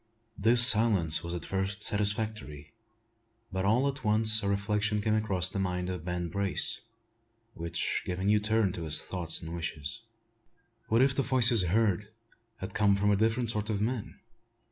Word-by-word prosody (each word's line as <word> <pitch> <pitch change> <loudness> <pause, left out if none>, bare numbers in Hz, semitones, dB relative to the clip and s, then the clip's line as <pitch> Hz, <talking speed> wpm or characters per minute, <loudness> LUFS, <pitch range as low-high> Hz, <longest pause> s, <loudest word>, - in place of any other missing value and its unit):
This 120 +4 +7
silence 105 -10 +5
was 85 +1 -4
at 85 - -6
first 95 +2 -3
satisfactory; 105 -7 -3 0.8
but 95 +1 -3
all 120 +7 +1
at 140 0 -5
once 110 0 +4
a 100 - -3
reflection 105 +1 -1
came 105 +1 -1
across 100 -5 +1
the 95 +1 -5
mind 90 -1 -3
of 90 -3 -7
Ben 90 0 -4
Brace, 100 +3 -2 0.7
which 85 0 -3
gave 90 0 -5
a - - -4
new 105 +2 +2
turn 105 -1 0
to 85 -2 -7
his 80 0 -1
thoughts 85 -4 -3
and 80 +1 -8
wishes. 80 -4 -6 0.9
What 115 +3 +2
if 135 0 +1
the 135 - -1
voices 125 -4 +3
heard 105 +1 -1 0.5
had 95 - -8
come 100 -1 +2
from 105 +1 0
a - - +2
different 115 +3 -1
sort 105 -1 -4
of 105 -2 -2
men? 115 +1 -4
100 Hz, 170 wpm, -28 LUFS, 90-110 Hz, 0.9 s, This